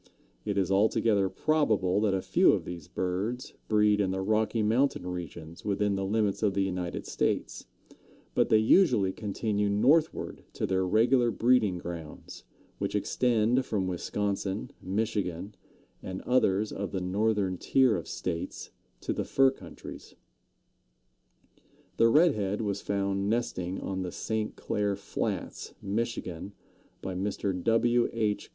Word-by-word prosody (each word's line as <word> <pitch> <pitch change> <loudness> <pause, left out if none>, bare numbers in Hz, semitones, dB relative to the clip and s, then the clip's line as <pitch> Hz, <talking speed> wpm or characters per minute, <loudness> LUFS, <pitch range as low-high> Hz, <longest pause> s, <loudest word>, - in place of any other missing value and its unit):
It 100 -1 -1
is 95 -1 +1
altogether 100 0 +3
probable 110 -12 +1
that 105 -3 +2
a 95 - -2
few - - +4
of - - -1
these 85 -3 -7
birds 100 +8 -3
breed 105 -1 +3
in 95 - +1
the 95 0 -2
Rocky 110 +2 +1
Mountain 120 0 +1
regions 85 -2 -7
within 100 0 0
the 95 - -2
limits 105 0 0
of 100 -3 +1
the 100 - +2
United 90 -2 -3
States, - - -2 0.7
but - - +2
they 110 - +6
usually 110 - +4
continue 105 0 -1
northward 135 +11 +2
to - - -2
their 95 0 0
regular 120 +5 +3
breeding 115 -5 +2
grounds, 85 -3 -8 0.4
which - - -2
extend 120 +1 +2
from 105 -7 -1
Wisconsin, 100 +4 -2
Michigan, 100 -2 -2 0.5
and 95 0 -6
others 110 -5 +2
of 100 -1 -4
the 95 - -2
northern 100 0 0
tier 130 -5 +3
of 85 - -5
states, 85 -2 -4 0.3
to - - -2
the - - -2
fur 135 -1 +4
countries. - - -11 1.8
The 115 - +5
Red 155 +5 +5
head 105 +1 -2
was 100 -2 -2
found 100 0 -1
nesting 95 -6 -1
on 95 -1 -3
the 90 -1 -4
St. 110 +2 -3
Clair 105 -1 -1
Flats, 100 - -4
Michigan, 100 -3 -3 0.5
by 95 - -3
Mr. 95 +1 -2
W. 120 +1 +3
H. 110 -3 -1
105 Hz, 140 wpm, -29 LUFS, 95-115 Hz, 1.8 s, they